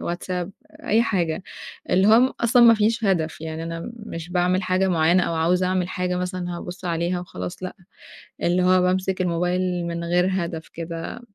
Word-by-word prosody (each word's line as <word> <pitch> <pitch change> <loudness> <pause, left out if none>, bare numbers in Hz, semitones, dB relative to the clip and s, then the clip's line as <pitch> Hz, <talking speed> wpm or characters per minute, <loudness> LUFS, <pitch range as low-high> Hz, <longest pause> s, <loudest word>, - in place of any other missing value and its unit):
WhatsApp، 175 +1 -3 0.4
أي 220 +3 +3
حاجة. 180 -6 -1 0.5
اللي 190 +3 +4
هو 240 +4 +5
أصلًا 240 +1 +4
مافيش 225 0 +4
هدف، 165 -6 0
يعني 160 0 -5
أنا 165 +5 -5 0.2
مش 165 +1 -7
باعمل 180 +1 +1
حاجة 185 +1 +1
معيّنة 170 +1 +3
أو 170 - -2
عاوزة 180 +3 +2
أعمل 185 -1 0
حاجة 180 -1 -2
مثلًا 180 -1 -3
هابُص 180 +1 -8
عليها 175 +1 -1
وخلاص، 90 - -7
لأ. 185 - -5 0.7
اللي 180 +1 +2
هو 185 0 +4
بامسك 185 +1 0
الموبايل 180 0 0
من 170 0 -4
غير 180 +2 +2
هدف 170 -3 -3
كده، 165 +6 -6
180 Hz, 165 wpm, -23 LUFS, 170-185 Hz, 0.7 s, هو